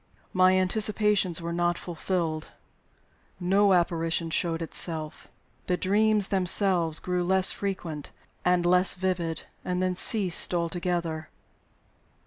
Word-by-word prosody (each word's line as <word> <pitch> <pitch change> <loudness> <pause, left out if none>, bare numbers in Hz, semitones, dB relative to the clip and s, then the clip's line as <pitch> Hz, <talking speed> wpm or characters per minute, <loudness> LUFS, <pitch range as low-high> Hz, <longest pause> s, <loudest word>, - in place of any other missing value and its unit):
My 185 0 +4
anticipations 205 -2 +1
were 170 0 -4
not 175 0 0
fulfilled; 165 -2 -4 0.9
no 195 +2 +2
apparition 165 -2 -1
showed 165 0 -1
itself. 160 -1 0 0.4
The 180 - 0
dreams 210 +1 +1
themselves 180 -3 +1
grew 180 +1 -2
less 190 +1 +4
frequent 175 -7 -5 0.3
and 180 -1 +1
less 180 +1 +3
vivid 180 -3 -3 0.2
and 180 0 -3
then 185 0 0
ceased 185 -2 +3
altogether. 170 -2 -3
180 Hz, 110 wpm, -26 LUFS, 170-190 Hz, 0.9 s, My